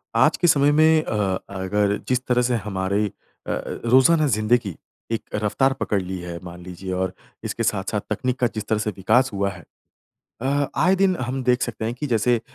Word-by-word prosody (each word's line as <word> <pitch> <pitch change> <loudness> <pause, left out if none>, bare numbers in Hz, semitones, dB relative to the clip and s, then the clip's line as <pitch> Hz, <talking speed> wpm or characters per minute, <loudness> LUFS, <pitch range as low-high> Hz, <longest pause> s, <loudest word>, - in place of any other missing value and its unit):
आज - - +4
के 175 - +2
समय 145 -1 +4
में 155 +1 +5
अ, 100 -3 0
अगर 100 +1 0
जिस 125 0 0
तरह 125 -1 +3
से 125 0 +1
हमारी 100 0 -1 0.4
अ - - -1
अ, - - -1 0.3
रोज़ाना 150 +5 +5
जिंदगी, 110 - +1 0.4
एक 115 - -1
रफ़्तार 110 +6 +1
पकड़ 100 -2 0
ली 95 +1 -5
है 85 -1 -6
मान 90 0 -9
लीजिए 90 +1 -7
और 95 0 -1 0.3
इसके - - -3
साथ-साथ - - -1
तकनीक 125 0 -2
का 125 - +3
जिस 110 -1 -4
तरह 110 - +1
से 105 - -1
विकास 115 +7 +3
हुआ 100 0 0
है। 85 -3 -10 0.8
अ, 140 +2 +1
आए 185 +3 +4
दिन 190 -1 +3
हम 130 +2 -2
देख 125 0 +2
सकते 110 -2 -3
हैं 115 - -2
कि 145 +4 -4
जैसे 120 0 +2
अ, - - -9
110 Hz, 200 wpm, -23 LUFS, 100-130 Hz, 0.8 s, में